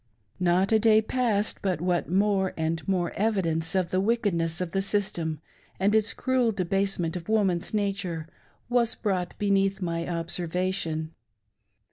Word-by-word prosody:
Not 180 +2 +2
a 220 - +5
day 220 0 +5
passed 220 -2 0
but 185 -5 0
what 175 -1 0
more 195 0 +1
and 160 0 -1
more 180 -3 0
evidence 180 -5 0
of 185 -2 +1
the 185 - +2
wickedness 190 -7 0
of 180 -2 -3
the 195 - 0
system, 175 -6 -1 0.4
and 200 +3 +2
its 220 0 +3
cruel 255 -3 +1
debasement 195 -3 -1
of 175 +2 -6
woman's 195 -6 +1
nature, 195 -6 -2 0.4
was 240 -1 +2
brought 185 -5 -2
beneath 195 -1 +1
my 170 -2 -2
observation. 170 -1 -2
190 Hz, 140 wpm, -27 LUFS, 170-205 Hz, 0.4 s, a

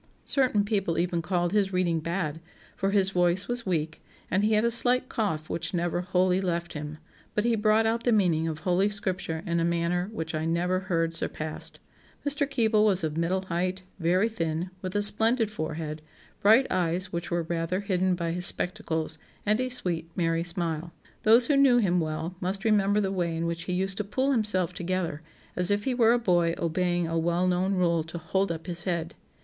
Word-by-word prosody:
Certain 250 -7 +2
people 195 -6 -1
even 170 0 0
called 175 +1 -1
his 200 -2 +2
reading 180 -3 +1
bad, 165 -1 -3 0.4
for 195 - -1
his 195 -1 +3
voice 180 +1 +2
was 240 -3 -3
weak, 160 -3 -2 0.3
and 190 +3 +2
he 215 +1 +2
had 215 +2 +3
a 235 - +2
slight 250 +2 +4
cough 160 -9 -2
which 170 - -3
never 175 0 -1
wholly 185 +1 +1
left 170 -2 -2
him; 150 0 -6 0.4
but 210 - +1
he 235 - +3
brought 215 +1 +3
out 230 +1 0
the 245 - +2
meaning 175 -7 +2
of 160 -2 -3
Holy 185 +4 +2
Scripture 185 -5 -3
in 170 -2 0
a - - +1
manner 170 +2 0
which 160 -7 -5
I 155 0 -2
never 175 +3 0
heard 165 -3 -1
surpassed. 155 -1 -4 0.5
Mr. 285 0 +1
Keble 225 -5 +2
was 195 -5 +3
of 155 -1 -2
middle 175 +3 0
height, 185 +1 -2 0.2
very 180 +5 +2
thin, 170 -5 -3
with 185 +1 -5
a 205 - +3
splendid 225 +2 +4
forehead, 155 -4 -4 0.4
bright 225 +6 +5
eyes 185 +1 0
which 170 0 -3
were 170 -1 0
rather 170 +3 -2
hidden 185 -2 +1
by 170 -1 -2
his 175 +1 +2
spectacles, 160 -3 -2 0.3
and 210 +2 +2
a 255 - -1
sweet 170 -9 -2
merry 165 -1 +1
smile. 170 -2 -2 0.3
Those 230 +3 +6
who 290 - +2
knew 275 -3 +5
him 180 -6 +2
well 160 +2 -3
must 195 +3 -2
remember 205 -1 +3
the 195 -1 -1
way 170 -3 -1
in 165 - -2
which 170 0 -3
he 180 - -2
used 190 +1 -1
to 210 - -1
pull 260 +7 0
himself 210 -7 +1
together, 175 -3 -2 0.3
as 180 -1 +2
if 205 0 +1
he 260 - 0
were 235 -2 +4
a - - +3
boy 175 -7 +2
obeying 175 +1 0
a 165 0 -1
well 170 +2 +1
known 185 +2 +1
rule 170 -3 +2
to 165 +1 -7
'hold 190 +4 -1
up 165 -1 -6
his 175 -2 -4
head. 170 -2 -2
180 Hz, 200 wpm, -27 LUFS, 170-205 Hz, 0.5 s, Those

